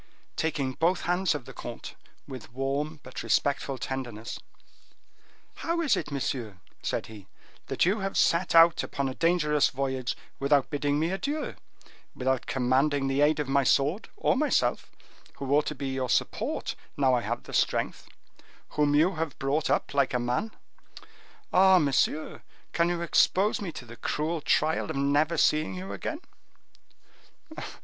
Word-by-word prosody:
Taking 145 -4 -1
both 175 +6 +1
hands 180 -1 +1
of 140 -5 -6
the - - -10
comte, - - -8 0.3
with 130 -5 -9
warm, 140 +4 -2
but 130 - -7
respectful 140 -1 0
tenderness,—"How 130 - -8
is 320 -4 +3
it, - - -3
monsieur," 125 -7 -3 0.2
said - - -2
he, 105 -3 -12 0.4
"that - - +1
you 200 +5 +2
have 195 0 -3
set 170 +1 +2
out 165 0 +7
upon 140 -1 -2
a 130 - -3
dangerous 150 -2 +2
voyage 130 -2 -2 0.2
without 140 0 +2
bidding 145 -1 0
me 160 +3 0
adieu, 285 +10 -2 0.6
without 130 0 -1
commanding 135 +2 +1
the 135 +1 +1
aid 150 +1 +3
of 150 - -1
my 140 +1 +2
sword, 145 - +1
of 265 - +1
myself, 305 - +1 0.5
who 140 0 -2
ought 150 - +2
to 150 - -3
be 135 0 -4
your 130 -1 -2
support, - - -1 0.2
now 135 -2 +3
I 125 - +2
have - - -3
the - - -11
strength; - - 0 0.6
whom 145 -1 +2
you 165 +4 +3
have 160 -2 -3
brought 145 +3 0
up - - 0
like 140 -3 +2
a - - +2
man? 125 - -1 1.0
Ah! 190 0 +7
monsieur, 150 0 +1 0.3
can 170 0 +2
you 175 -1 -1
expose 190 +5 +3
me 190 -4 -4
to 125 - -8
the 120 0 -12
cruel 155 +2 -2
trial 155 +2 +1
of - - -3
never 145 +4 +2
seeing 155 +4 +2
you 185 +1 -6
again?" - - -5
145 Hz, 155 wpm, -28 LUFS, 135-170 Hz, 1.0 s, out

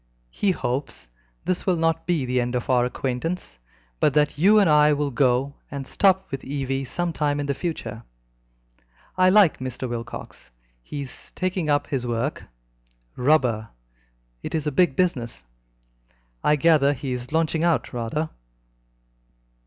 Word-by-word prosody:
He 205 - 0
hopes 125 - -2
that - - -27 0.3
this 185 +1 -1
will 185 - +4
not 165 0 0
be 165 -7 +1
the 125 0 +1
end 120 +1 -2
of 125 +1 -1
our 125 -1 +4
acquaintance, 125 - -3 0.4
but 145 - +2
that 150 -1 +3
you 200 +8 +5
and 200 -3 +5
I 150 -1 +5
will 145 -1 -1
go 130 +2 +2 0.2
and 140 -1 -5
stop 190 +5 +3
with 135 - -4
Evie 135 -1 -2
some 175 +6 -2
time 145 -2 0
in 145 - -2
the 140 - 0
future. 125 - -4 1.1
I 185 0 +5
like 195 -4 +5
Mr. 130 0 -4
Wilcox. 120 - -7 0.3
He 145 - -6
is 135 -2 -9
taking 185 -3 -2
up 145 0 +2
his 130 -3 -2
work 120 +5 -2 0.7
rubber 125 -5 +2 0.7
it - - -4
is 155 -2 -1
a 150 - 0
big 155 -1 +3
business. 125 - -1 1.0
I 150 - +4
gather 150 -2 +4
he 135 -1 -4
is 125 +1 -6
launching 160 0 +1
out 170 -5 +1
rather. 125 +7 -2
145 Hz, 155 wpm, -24 LUFS, 125-165 Hz, 1.1 s, you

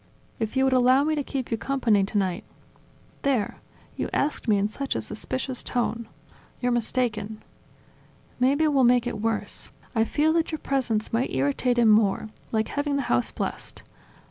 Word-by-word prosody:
"If 225 +3 -2
you 265 - +4
would 265 -1 +3
allow 255 +2 +5
me 310 +1 +1
to 300 - 0
keep 265 -3 -4
you 225 - 0
company 235 -7 +2
tonight 190 -3 -1 0.4
..." - - -30
"There: 260 -7 0 0.4
you - - -3
asked 285 -2 -1
me 210 -2 +4
in 200 +1 +1
such 275 +6 -4
a - - 0
suspicious 260 -1 -3
tone.. 235 -2 -2 0.3
." - - -28
"You're 245 0 0
mistaken." 220 -3 -1 1.0
"Maybe 280 +5 +3
we'll 280 -3 +3
make 245 0 +4
it 220 -4 -3
worse: 225 0 -2 0.2
I 225 -2 +3
fear 310 +6 +2
that 330 0 +1
your 315 - -2
presence 245 -8 -1
might 235 +3 +1
irritate 145 - +1
him 235 -2 +5
more, 215 0 +3 0.2
like 220 -1 0
having 285 0 -1
the 280 - 0
house 120 0 +1
blessed. - - -5
245 Hz, 175 wpm, -25 LUFS, 215-275 Hz, 1.0 s, allow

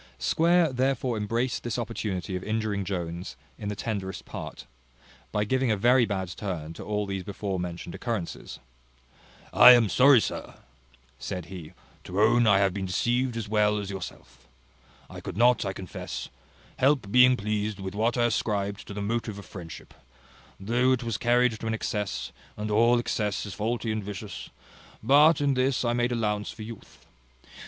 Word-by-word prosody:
Square 165 - +3
therefore 130 -1 0
embraced 115 +4 -1
this 120 - -3
opportunity 105 -6 -3
of 90 - -4
injuring 110 -2 -1
Jones 85 -2 -5 0.2
in 105 - -4
the 105 - -3
tenderest 100 -3 -4
part, - - -8 0.7
by 105 - 0
giving 130 +4 +1
a 110 - +2
very 120 +3 +4
bad 95 -3 -2
turn 85 -4 -5
to - - -9
all 105 -1 -2
these 95 -1 -3
before 100 -1 -4
mentioned 85 -1 -5
occurrences. 115 -8 -5 1.0
"I 125 - +10
am 120 -4 +4
sorry, 135 +2 +6
sir," - - -4 0.6
said 90 -3 -5
he, 85 -5 -9 0.3
"to 90 +2 -3
own 120 +2 +4
I 100 -2 +6
have 100 -2 +2
been 95 -1 -3
deceived 120 +6 0
as 115 - -4
well 105 0 +2
as 100 -1 -4
yourself. 65 -9 -9 0.6
I - - -10
could - - -7
not, 120 +1 +4
I 95 - -1
confess, 95 -2 -7 0.5
help 130 -6 +2
being 125 +1 +6
pleased 105 -1 -2
with 95 -1 -5
what 115 +4 0
I 120 - +3
ascribed 100 -3 -1
to 100 - -7
the 105 - -3
motive 110 -1 -2
of 100 - -10
friendship, 85 -4 -10 0.7
though 120 +6 +2
it 125 - -1
was 115 -3 -3
carried 120 +1 +3
to 115 - -5
an 110 - 0
excess, 105 -2 -3 0.3
and 105 0 -3
all 115 +3 +4
excess 105 -4 -1
is 100 - -6
faulty 115 +1 -2
and 110 -1 -2
vicious: 100 -2 -7 0.5
but 145 +6 +5
in 140 -1 +2
this 130 0 +1
I 120 - +1
made 120 0 +1
allowance 105 -3 -1
for 110 - -8
youth. 115 -1 -11
105 Hz, 170 wpm, -27 LUFS, 100-120 Hz, 1.0 s, I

